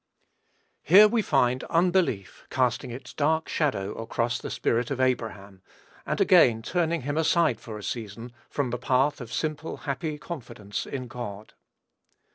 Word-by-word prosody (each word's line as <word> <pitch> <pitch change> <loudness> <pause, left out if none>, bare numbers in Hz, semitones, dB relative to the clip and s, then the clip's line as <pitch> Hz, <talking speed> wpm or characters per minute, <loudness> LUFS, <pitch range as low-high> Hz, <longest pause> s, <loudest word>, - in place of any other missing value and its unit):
Here 200 +6 +8
we 230 +1 +1
find 125 - +2
unbelief 170 - 0
casting 125 0 0
its 120 +3 -8
dark 160 +2 +1
shadow 105 -10 -1
across 115 +1 -2
the - - -6
spirit 120 +1 0
of 135 - -3
Abraham, 110 -7 -2 0.5
and - - -1
again 115 -2 +5
turning 170 +1 0
him 145 +3 -1
aside 160 -5 +2
for 110 -2 -8
a 105 - -9
season 115 +2 -5 0.2
from 135 -4 -2
the 125 - -3
path 130 +3 +1
of 115 -2 -8
simple, 155 0 -3
happy 150 +2 -3
confidence 120 - -6
in 130 -2 -5
God. 110 -3 -7
125 Hz, 145 wpm, -26 LUFS, 115-155 Hz, 0.5 s, Here